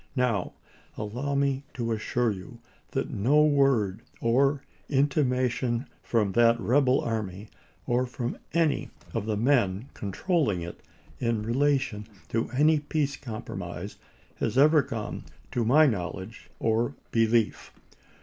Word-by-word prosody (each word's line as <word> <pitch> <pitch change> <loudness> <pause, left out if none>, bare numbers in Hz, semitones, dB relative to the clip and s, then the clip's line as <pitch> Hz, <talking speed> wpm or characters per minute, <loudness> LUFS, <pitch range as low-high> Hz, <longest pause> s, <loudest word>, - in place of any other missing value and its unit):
Now, 120 -8 0 0.4
allow 125 +7 -3
me 140 -1 +1
to 115 -2 -2
assure 115 +1 0
you 100 +5 -8 0.3
that 135 +3 -2
no 140 +7 +4
word 135 -9 +2 0.2
or 135 +4 +2 0.3
intimation 130 -3 +1 0.2
from 105 -4 +1
that 115 +2 +4
rebel 130 +2 +3
army, 105 -3 -4 0.4
or 125 +1 +1
from 120 0 -4
any 165 -3 +1 0.2
of 110 -2 -2
the 105 -2 0
men 115 -2 +2
controlling 105 - 0
it, 85 - -8 0.4
in 115 -3 0
relation 130 -3 0 0.2
to 115 0 -1
any 150 +4 +3
peace 145 -1 -1
compromise, 100 -5 -6 0.4
has 115 +2 -1
ever 150 +2 +6
come 115 -5 -5 0.3
to 120 - 0
my 145 +8 +6
knowledge 100 -2 -3
or 115 +1 +1 0.2
belief. 115 -1 +1
120 Hz, 120 wpm, -27 LUFS, 110-140 Hz, 0.4 s, ever